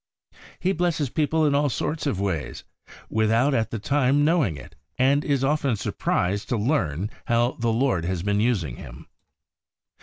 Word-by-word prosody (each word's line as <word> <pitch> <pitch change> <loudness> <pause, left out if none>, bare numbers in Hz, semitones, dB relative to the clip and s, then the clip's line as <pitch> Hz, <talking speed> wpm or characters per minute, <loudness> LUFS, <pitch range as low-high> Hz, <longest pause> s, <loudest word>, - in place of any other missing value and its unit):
He 185 - +1
blesses 160 -7 -1
people 155 +1 +1
in 145 - +2
all 145 +1 +2
sorts 155 +5 -2
of 100 -9 -1
ways, 95 -7 -3 0.4
without 115 +6 +2
at 115 -3 0
the 115 - -4
time 140 +4 +2
knowing 150 - +2
it, 70 - -12 0.2
and 140 +3 +3
is 140 -2 0
often 140 -3 +1
surprised 100 0 -1
to 120 - 0
learn 105 - -1 0.2
how 120 +1 +2
the 115 0 0
Lord 115 -6 +1
has 90 -1 -2
been 100 0 +1
using 95 - 0
him. - - -11
120 Hz, 160 wpm, -24 LUFS, 100-145 Hz, 0.4 s, and